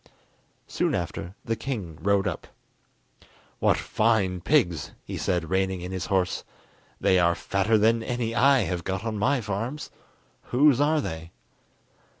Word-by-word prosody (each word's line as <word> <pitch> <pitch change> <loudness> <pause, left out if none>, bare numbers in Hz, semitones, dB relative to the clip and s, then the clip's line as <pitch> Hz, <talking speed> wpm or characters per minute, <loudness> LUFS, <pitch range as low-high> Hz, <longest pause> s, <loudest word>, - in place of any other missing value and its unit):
Soon - - 0
after 90 +3 -4
the 115 - 0
king 105 - -5
rode 100 +2 +2
up. 90 - -4 1.1
"What - - +3
fine 105 -5 +1
pigs!" 85 - +1
he - - -6
said, 85 -3 -1
reining 95 -1 0
in 90 +1 -6
his 95 -2 -4
horse. 95 -2 0 0.6
"They 95 - +3
are 85 0 +3
fatter 100 +5 +1
than 115 +2 +3
any 120 -1 -2
I 135 +2 +5
have 90 -4 -2
got 95 +4 -3
on 110 -2 -2
my 130 +4 +2
farms. 115 +8 -4 0.5
Whose 140 +1 +4
are 155 +1 +3
they?" 80 -7 -6
100 Hz, 145 wpm, -26 LUFS, 90-120 Hz, 1.1 s, I